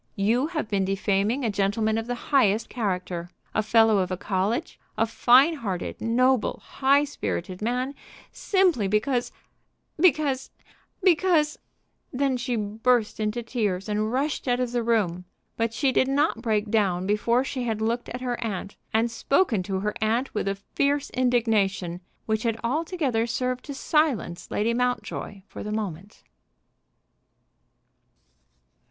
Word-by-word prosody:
You 230 +8 +2
have 315 -7 -3
been 200 -2 0
defaming 200 +6 0
a 220 - +1
gentleman 205 +2 +1
of 225 +1 -2
the 245 - -2 0.2
highest 225 -6 +3
character, 180 -6 -3 0.2
a - - +2
Fellow 220 -1 +4
of 185 -1 0
a 185 - -2
college, 195 +4 -2 0.2
a 225 - +3
fine 250 +7 +5
hearted, 195 -9 -4
noble, 250 +1 +2
high 280 +2 +3
spirited 180 - -4
man, 250 +4 -1 0.4
simply 360 - +2
because 240 +5 0 0.7
because 290 -6 +2 0.5
because 335 -4 +3 0.3
" - - -47
Then 275 -2 +2
she 245 0 -2
burst 220 +2 0
into 215 +2 -1
tears 210 -5 -2
and 215 +1 -1
rushed 275 +2 -1
out 245 0 +2
of 250 -1 -1
the 240 -1 0
room; 200 -7 0 0.3
but 230 0 0
she 265 +4 +1
did 260 - +2
not 275 -4 +1
break 215 -3 0
down 190 -5 +1
before 230 +5 +2
she 260 -2 -3
had 220 -2 -1
looked 230 +2 -1
at 250 - -6
her 245 -1 -2
aunt, 200 -2 -4
and 225 +2 +1
spoken 255 - +1
to 190 +1 -3
her 210 +1 -1
aunt 230 +5 0
with 210 - -2
a 195 - 0
fierce 280 +8 -1
indignation 215 -8 +1 0.2
which 220 -1 0
had 225 -1 -1
altogether 275 -3 0
served 250 +1 -2
to 285 - -6
silence 270 - 0
Lady 225 +3 0
Mountjoy 245 -5 -2
for - - -9
the 210 - -5
moment. 205 -3 -5
230 Hz, 145 wpm, -25 LUFS, 205-255 Hz, 0.7 s, fine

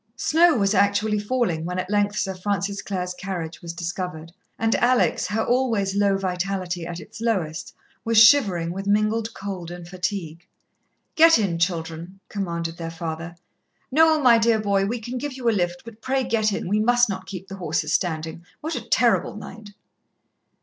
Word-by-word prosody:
Snow 330 +5 +4
was 200 -3 +2
actually 205 +1 +2
falling 205 -7 -1
when 180 +2 -4
at 185 - -2
length 205 +1 0
Sir 190 -2 -1
Francis 200 +1 -2
Clare's 180 -2 -3
carriage 180 -4 -6
was 170 - -6
discovered, 170 -1 -5 0.3
and 225 0 +1
Alex, 250 +1 +2
her 220 +2 -1
always 230 -6 +1
low 200 -1 +2
vitality 180 -2 -3
at 175 0 -6
its 220 +4 -12
lowest, 180 -10 -2 0.3
was 230 0 0
shivering 205 -9 +5
with 195 +2 -5
mingled 215 +2 +1
cold 190 -4 -6
and 175 -1 -9
fatigue. 180 -2 -4 0.7
"Get 330 +1 +7
in, 190 -6 -1
children," 170 +1 -3
commanded 170 -4 -4
their 165 -1 -5
father. 165 0 -6 0.6
"Noel, 315 +2 +4
my 240 -4 +6
dear 225 0 +3
boy, 200 -2 +1
we 235 +3 -2
can 240 +3 -5
give 290 +1 -4
you 255 -2 -4
a - - +5
lift, 175 -4 -1
but 230 -1 -12
pray 265 0 0
get 220 -3 +1
in 200 - -3
we 205 +3 +1
must 245 +2 +4
not 190 -2 -5
keep 190 -1 -7
the 195 0 -8
horses 155 -3 -1
standing. 160 -1 -2 0.2
What 315 +2 -4
a 245 - -3
terrible 240 -2 +2
night!" 210 0 -10
195 Hz, 175 wpm, -23 LUFS, 175-225 Hz, 0.7 s, Get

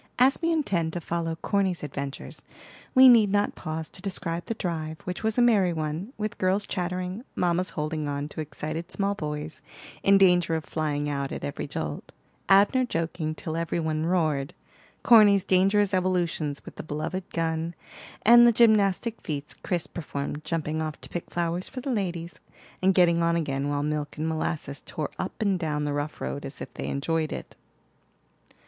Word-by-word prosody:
As 260 +2 +4
we 335 0 +2
intend 180 - 0
to 175 - -2
follow 165 0 -2
Corny's 190 0 0
adventures, 140 -1 -5 0.5
we 260 0 +9
need 225 -5 +7
not 205 0 +2
pause 160 -1 -5
to - - -8
describe 175 -3 -3
the 230 - -2
drive, 160 -5 -3
which 180 -1 -5
was 220 0 0
a 245 - +5
merry 200 -7 +4
one; 160 +7 -3
with 215 0 -4
girls 190 +2 +1
chattering, 185 +3 -3
mammas 180 +1 +1
holding 155 -1 -3
on 145 0 -2
to 155 - -5
excited 155 +3 -5
small 200 +2 0
boys, 150 -3 -5 0.4
in 195 0 +5
danger 180 -3 +4
of 160 - -3
flying 150 -2 -2
out 140 -1 -2
at - - -5
every 145 - -4
jolt, 75 - -5 0.4
Abner 200 +7 +5
joking 165 -6 -2
till 160 0 -5
every 170 0 -1
one 155 -1 -1
roared, 155 -6 0 0.5
Corny's 205 -4 +7
dangerous 195 +2 +3
evolutions 175 -6 0
with - - -11
the - - -4
beloved 155 +5 -4
gun, 165 0 -2 0.5
and 240 +2 +8
the - - +7
gymnastic 220 -1 +3
feats 145 -1 -4
Chris 175 -3 -3
performed, 145 -2 -5
jumping 160 -1 -2
off 155 -1 -4
to - - -9
pick 175 - -5
flowers 175 +1 -1
for 265 - -7
the 265 +2 -3
ladies, 175 -5 -3 0.4
and 190 0 +3
getting 170 -2 +4
on 170 0 +2
again 140 -4 -1
while 145 0 -1
Milk 150 0 -3
and 155 +1 -1
Molasses 155 -3 -3
tore 155 -2 -4
up 185 - -4
and 195 -3 +1
down 150 -3 -1
the 145 -1 -1
rough 145 +1 -3
road 140 - -4
as 135 - -8
if - - -8
they - - -5
enjoyed 155 +2 -1
it. - - -7
170 Hz, 180 wpm, -26 LUFS, 155-195 Hz, 0.5 s, we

